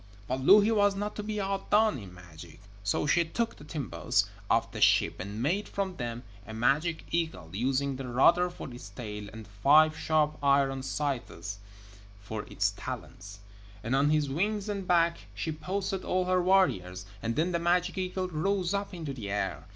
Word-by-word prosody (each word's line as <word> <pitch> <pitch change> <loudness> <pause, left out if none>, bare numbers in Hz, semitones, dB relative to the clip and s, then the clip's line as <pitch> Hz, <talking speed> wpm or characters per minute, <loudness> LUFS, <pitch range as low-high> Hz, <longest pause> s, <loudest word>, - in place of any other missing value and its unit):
But 130 +4 -2
Louhi 205 +9 +6
was 205 -2 +3
not 205 +1 -3
to - - -2
be 210 0 -3
outdone 195 -2 +1
in 100 -4 -10
magic, 85 -2 -13 0.2
so 100 - 0
she 170 +3 +3
took 230 +8 -2
the - - -12
timbers 145 - -1 0.2
of - - +2
the - - -6
ship - - +4
and 100 +5 -5
made 185 +9 0
from 190 -2 -3
them 120 -1 -4 0.2
a 110 - -7
magic 150 +8 +1
eagle, 160 - -2
using 135 +5 0
the 135 -1 -6
rudder 170 +9 +4
for 135 -7 -9
its 120 - -10
tail 105 -4 -7
and 110 0 -10
five 145 +10 +4
sharp 155 -1 +1
iron 140 -1 +3
scythes 130 -8 -3 0.6
for 105 +1 -6
its - - +1
talons. 100 +1 -8 0.4
And 120 +4 0
on 140 +2 +3
his 150 -1 +2
wings 200 +9 -1
and 200 -3 -4
back 170 -1 +3 0.2
she 160 - -2
posted 190 +4 -3
all 185 0 0
her 185 0 +2
warriors, 95 - +2 0.2
and 115 0 -2
then 165 +4 +1
the 170 - 0
magic 175 +2 +1
eagle 185 0 -2
rose 180 +2 -1
up 200 -1 -2
into 155 -5 -5
the 110 -6 -6
air. 100 +1 -2
155 Hz, 180 wpm, -29 LUFS, 120-185 Hz, 0.6 s, Louhi